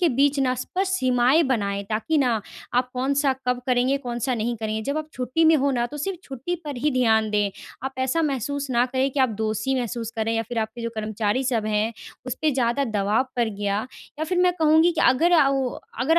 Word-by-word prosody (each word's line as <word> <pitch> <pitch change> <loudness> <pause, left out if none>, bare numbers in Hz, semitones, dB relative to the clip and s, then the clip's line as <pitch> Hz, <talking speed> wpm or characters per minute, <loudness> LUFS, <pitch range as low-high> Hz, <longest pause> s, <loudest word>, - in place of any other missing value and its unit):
के 345 - +4
बीच 280 +2 +2
ना 255 -1 +2
स्पष्ट 375 +9 -2
सीमाएँ 255 0 +3
बनाएँ, 200 -6 -1
ताकि 220 +10 0
ना, 240 -5 +2 0.3
आप 250 0 +2
कौन-सा 275 +2 +1
कब 250 0 +1
करेंगे, 255 +2 +2
कौन-सा 245 -1 -2
नहीं 235 +1 -1
करेंगे। 220 0 -3
जब 280 +5 -2
आप 310 0 -5
छुट्टी 255 +6 0
में 320 0 +6
हों 280 0 +1
ना, 240 -1 0
तो 295 - -9
सिर्फ 360 +4 -3
छुट्टी 270 +6 -4
पर 290 -3 -5
ही 295 +5 +1
ध्यान 220 -4 +3
दें। 205 -1 +1 0.3
आप 265 - -3
ऐसा 260 +6 +1
महसूस 280 0 -2
ना 240 +1 +3
करें 260 +1 0
कि 270 - -1
आप 260 - +4
दोषी 220 +5 -1
महसूस 235 -1 -4
करें 225 +1 0
या 225 - +1
फिर 240 -2 -3
आपके 220 +2 -3
जो 230 - -2
कर्मचारी 215 +3 -1
सब 230 -4 0
हैं, 215 +2 0 0.3
उस 255 - -2
पे 310 - +3
ज़्यादा 255 0 +1
दबाव 215 +2 +1
पड़ 235 -2 +2
गया 205 +2 -2 0.3
या 315 - -1
फिर 360 +2 -1
मैं 360 0 +4
कहूँगी 320 +3 +5
कि - - -2
अगर 325 +7 +3
आ 300 -5 +6
वो 270 -2 +1 0.3
अगर 320 +6 +4
255 Hz, 220 wpm, -24 LUFS, 225-280 Hz, 0.3 s, में